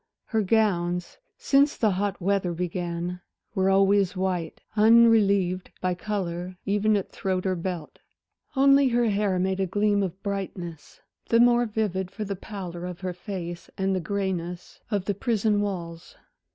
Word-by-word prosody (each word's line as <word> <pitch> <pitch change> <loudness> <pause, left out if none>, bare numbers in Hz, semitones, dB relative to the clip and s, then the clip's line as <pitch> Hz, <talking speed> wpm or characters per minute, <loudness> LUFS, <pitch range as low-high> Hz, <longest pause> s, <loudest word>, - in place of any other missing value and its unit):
Her 220 -2 0
gowns, 180 -4 0 0.2
since 285 - +3
the 215 -3 +2
hot 195 +1 -1
weather 190 -1 0
began, 175 0 -3 0.3
were 190 -2 +2
always 195 0 +3
white, 180 -3 -2 0.2
unrelieved 210 -5 +4
by 185 -1 0
color 180 -2 -4
even 210 +1 +2
at 195 - -4
throat 185 -1 -2
or 185 -1 +1
belt. 170 -2 -5 0.6
Only 275 0 +5
her 240 -2 +2
hair 200 -2 +1
made 190 +1 0
a 190 - +1
gleam 205 +2 +2
of 190 0 -4
brightness, 185 -5 -5 0.3
the 230 - +4
more 240 0 +5
vivid 205 -4 -2
for 215 +3 -6
the 200 0 -3
pallor 180 -3 -7
of 180 0 -8
her 185 -1 -3
face 175 -2 -6
and 190 0 +1
the - - 0
grayness 180 -1 -4
of 205 -4 -1
the 205 - 0
prison 210 0 +1
walls. 175 -4 -5
195 Hz, 150 wpm, -26 LUFS, 180-210 Hz, 0.6 s, Only